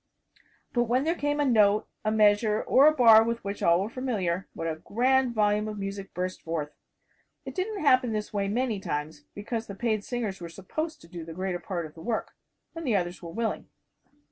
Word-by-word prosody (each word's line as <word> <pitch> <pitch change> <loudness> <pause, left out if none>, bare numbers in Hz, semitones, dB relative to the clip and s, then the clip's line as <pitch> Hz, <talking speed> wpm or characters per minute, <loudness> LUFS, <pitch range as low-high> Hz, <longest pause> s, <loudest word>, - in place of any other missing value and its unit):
But 240 -1 +2
when 250 +3 +1
there 325 +2 +1
came 290 -3 -1
a 290 - +3
note, 215 -4 +4 0.2
a 215 - +1
measure 215 0 +3
or 275 +3 +6
a - - +7
bar 230 -6 +7
with 235 +1 -2
which 200 0 -5
all 170 +1 +4
were 195 - -1
familiar, 195 -9 -2
what 165 - -4
a 160 -1 -2
grand 250 +6 +1
volume 210 0 +2
of 215 -1 -5
music 195 0 -5
burst 185 +1 -3
forth. 160 -3 -3 0.7
It - - -6
didn't 395 +1 -3
happen 255 -4 +4
this 215 -1 -3
way 200 -1 0
many 230 0 -1
times, 150 -3 -4
because 225 +2 -4
the 200 - -7
paid 215 -1 -1
singers 215 -7 -4
were 170 - -6
supposed 310 - -5
to - - -15
do 170 -1 -8
the 165 0 -8
greater 185 +1 -3
part 175 -1 -4
of 155 - -11
the 160 - -12
work. 225 +4 -2 0.4
And 330 0 -6
the 230 - +2
others 175 -2 -2
were 170 - -7
willing. 225 +6 -3
210 Hz, 210 wpm, -27 LUFS, 185-240 Hz, 0.7 s, a